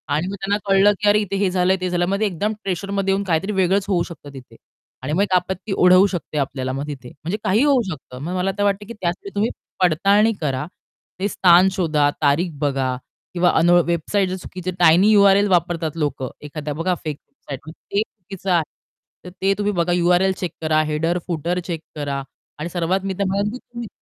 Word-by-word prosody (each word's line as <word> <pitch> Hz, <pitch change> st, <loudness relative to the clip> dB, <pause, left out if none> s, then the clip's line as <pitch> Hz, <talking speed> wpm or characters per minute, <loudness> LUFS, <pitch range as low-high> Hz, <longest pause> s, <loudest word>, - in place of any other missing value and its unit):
आणि 160 Hz, +4 st, -1 dB
मग 195 Hz, -, -4 dB
त्यांना 200 Hz, +1 st, 0 dB
कळलं, 195 Hz, +1 st, +5 dB
की 210 Hz, -, +1 dB
"अरे, 210 Hz, -, +5 dB
इथे 200 Hz, -2 st, -3 dB
हे 195 Hz, -2 st, +2 dB
झालं 185 Hz, 0 st, +2 dB
ते 185 Hz, -, -1 dB
झालं." 175 Hz, 0 st, +1 dB
मग 200 Hz, +2 st, -1 dB
एकदम 205 Hz, +2 st, -1 dB
प्रेशरमध्ये 195 Hz, +1 st, -1 dB
येऊन 200 Hz, +1 st, 0 dB
काहीतरी 180 Hz, +4 st, 0 dB
वेगळंच 190 Hz, 0 st, +1 dB
होऊ 175 Hz, -4 st, +1 dB
शकतं 145 Hz, -3 st, -11 dB
तिथे. 130 Hz, -2 st, -12 dB, 0.5 s
आणि 145 Hz, -, -2 dB
मग 185 Hz, -, +2 dB
एक 200 Hz, -, -2 dB
आपत्ती 190 Hz, +3 st, -1 dB
ओढवू 185 Hz, +1 st, +6 dB
शकते 175 Hz, -5 st, -5 dB
आपल्याला 130 Hz, -2 st, -2 dB
मग 140 Hz, +2 st, -4 dB
तिथे 130 Hz, -4 st, -7 dB
म्हणजे 170 Hz, +8 st, -5 dB
काहीही 215 Hz, +9 st, +3 dB
होऊ 275 Hz, -4 st, +4 dB
शकतं. 130 Hz, -6 st, -8 dB
मग 180 Hz, +3 st, -3 dB
मला 185 Hz, +1 st, 0 dB
तर 205 Hz, -, +1 dB
वाटतं, 205 Hz, 0 st, 0 dB
की 235 Hz, -, -7 dB
त्यासाठी 175 Hz, +3 st, -3 dB
तुम्ही 215 Hz, +3 st, +1 dB, 0.3 s
पडताळणी 200 Hz, +6 st, +3 dB
करा. 140 Hz, -2 st, -1 dB, 0.5 s
ते 195 Hz, -, 0 dB
स्थान 185 Hz, -1 st, +5 dB
शोधा, 155 Hz, -6 st, +1 dB
तारीख 155 Hz, +4 st, +2 dB
बघा 135 Hz, -3 st, 0 dB, 0.4 s
किंवा 180 Hz, 0 st, +3 dB
अन 170 Hz, -, +3 dB, 0.2 s
वेबसाईट 180 Hz, +3 st, 0 dB
चुकीची 185 Hz, 0 st, -6 dB
टायनी 175 Hz, +5 st, +6 dB
यू-आर-एल 200 Hz, -1 st, +5 dB
वापरतात 170 Hz, -2 st, 0 dB
लोकं. 140 Hz, -4 st, -2 dB
एखाद्या 150 Hz, 0 st, -5 dB
बघा 175 Hz, +4 st, -1 dB
फेक 150 Hz, -2 st, -4 dB
वेबसाईट, 135 Hz, -3 st, -9 dB, 0.3 s
ते 200 Hz, +1 st, +2 dB
चुकीचं 195 Hz, -2 st, -9 dB
आहे. 170 Hz, -2 st, +3 dB, 0.6 s
तर 180 Hz, -, -7 dB
ते 195 Hz, +1 st, +3 dB
तुम्ही 205 Hz, 0 st, 0 dB
बघा, 175 Hz, 0 st, 0 dB
यू-आर-एल 180 Hz, +2 st, +3 dB
चेक 180 Hz, -, -2 dB
करा, 155 Hz, -1 st, +2 dB
हेडर 155 Hz, +3 st, 0 dB
फूटर 175 Hz, +1 st, -1 dB
चेक 165 Hz, -3 st, -3 dB
करा 140 Hz, -2 st, -3 dB, 0.4 s
आणि 170 Hz, -, -4 dB
सर्वात 175 Hz, +2 st, 0 dB
मी 195 Hz, -, -1 dB
तर 200 Hz, -, +2 dB
म्हणेल, 200 Hz, +2 st, 0 dB
की 250 Hz, -, -6 dB
तुम्ही 240 Hz, -2 st, -9 dB
180 Hz, 200 wpm, -21 LUFS, 155-195 Hz, 0.6 s, ओढवू